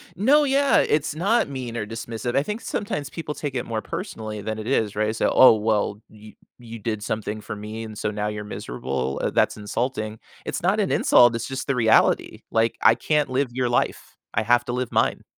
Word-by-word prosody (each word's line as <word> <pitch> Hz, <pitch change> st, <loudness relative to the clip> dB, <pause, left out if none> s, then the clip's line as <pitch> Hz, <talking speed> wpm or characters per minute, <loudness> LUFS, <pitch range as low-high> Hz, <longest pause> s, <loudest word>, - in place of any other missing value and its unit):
No, 270 Hz, -, +4 dB
yeah. 280 Hz, 0 st, +3 dB
It's 150 Hz, 0 st, +1 dB
not 200 Hz, +9 st, +2 dB
mean 125 Hz, -4 st, -5 dB
or 110 Hz, -, -2 dB
dismissive. 115 Hz, +2 st, -5 dB
I 140 Hz, -, +3 dB
think 210 Hz, +7 st, -4 dB
sometimes 150 Hz, -9 st, -3 dB
people 160 Hz, -3 st, -5 dB
take 145 Hz, -2 st, -5 dB
it 120 Hz, -, -2 dB
more 110 Hz, -2 st, -3 dB
personally 110 Hz, -1 st, -6 dB
than 110 Hz, +1 st, -4 dB
it 110 Hz, -, -6 dB
is, 110 Hz, -6 st, 0 dB
right? 110 Hz, +1 st, 0 dB
So, -, -, +1 dB
"Oh, 130 Hz, -, +8 dB
well, 105 Hz, -1 st, 0 dB
you 110 Hz, 0 st, -14 dB, 0.3 s
you 115 Hz, -1 st, -9 dB
did 110 Hz, 0 st, -3 dB
something 110 Hz, 0 st, -3 dB
for 105 Hz, -, -6 dB
me, 105 Hz, +2 st, -7 dB
and 110 Hz, -2 st, -8 dB
so 105 Hz, -, -2 dB
now 105 Hz, 0 st, -2 dB
you're 105 Hz, 0 st, -4 dB
miserable? 65 Hz, -7 st, -4 dB
Uh, -, -, +1 dB
that's -, -, +2 dB
insulting." 110 Hz, +1 st, -3 dB, 0.3 s
It's -, -, -3 dB
not -, -, +2 dB
an -, -, +1 dB
insult, 120 Hz, -1 st, +5 dB
it's 115 Hz, -, -3 dB
just 130 Hz, -1 st, -5 dB
the 140 Hz, -, +1 dB
reality. 115 Hz, -3 st, +3 dB
Like, 115 Hz, 0 st, +1 dB
I -, -, +6 dB
can't 150 Hz, -2 st, 0 dB
live 130 Hz, 0 st, 0 dB
your 125 Hz, 0 st, -1 dB
life. 120 Hz, -, -1 dB, 0.2 s
I 110 Hz, -, +1 dB
have 120 Hz, +2 st, +3 dB
to 120 Hz, -, -3 dB
live 125 Hz, -1 st, -2 dB
mine. -, -, +1 dB
115 Hz, 215 wpm, -23 LUFS, 110-135 Hz, 0.3 s, Oh